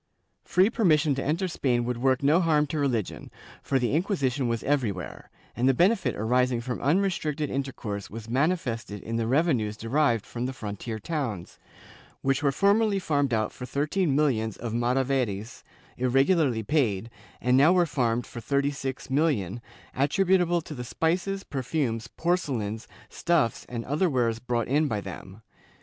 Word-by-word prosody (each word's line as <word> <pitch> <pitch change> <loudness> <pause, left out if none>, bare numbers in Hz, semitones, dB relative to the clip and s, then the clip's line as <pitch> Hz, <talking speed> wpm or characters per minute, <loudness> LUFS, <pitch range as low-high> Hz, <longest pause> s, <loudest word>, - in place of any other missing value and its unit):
Free 190 +5 +3
permission 160 - +3
to 135 - -3
enter 170 +6 0
Spain 125 -8 0
would 125 0 -2
work 130 +1 +1
no 155 +6 +4
harm 155 -3 +3
to 150 +1 -3
religion, 125 -8 -2 0.3
for 135 - 0
the 125 0 0
Inquisition 145 - 0
was 115 -1 -2
everywhere, 115 - -2 0.3
and 125 +2 +2
the 135 - +3
benefit 195 - +2
arising 125 +3 +1
from 125 +1 -4
unrestricted 155 -2 0
intercourse 125 -7 -4
was 110 0 -8
manifested 125 - -1
in 115 +1 -3
the 115 -1 -1
reve 155 +6 +3
nues 105 -2 -3
derived 115 -1 +1
from 120 +1 -4
the 130 - -4
frontier 110 -1 -5
towns, 110 - -4 0.6
which 135 +1 +1
were 140 -2 +2
formerly 200 +5 +3
farmed 145 -7 0
out 110 -2 0
for 125 - -8
thirteen 150 +3 0
millions 115 -8 +1
of 115 -2 -5
maravedls, 120 -3 -1 0.4
irregularly 135 -1 +2
paid, 115 -4 0 0.3
and 125 +1 +2
now 145 +6 +6
were 180 -1 +4
farmed 120 -6 0
for 120 - -8
thirty 140 +5 +1
six 135 -2 -5
millions, 130 - +1 0.4
attributable 175 +4 +2
to 155 - -9
the 125 -4 -6
spices, 180 +9 -1
perfumes, 130 -4 -2
porcelains, 125 - -2 0.2
stuffs 165 -9 0
and 115 -1 -5
other 155 +7 +1
wares 120 -5 0
brought 120 -2 -1
in 150 +4 +2
by 105 -6 -1
them. 95 +2 -9
135 Hz, 160 wpm, -27 LUFS, 115-155 Hz, 0.6 s, now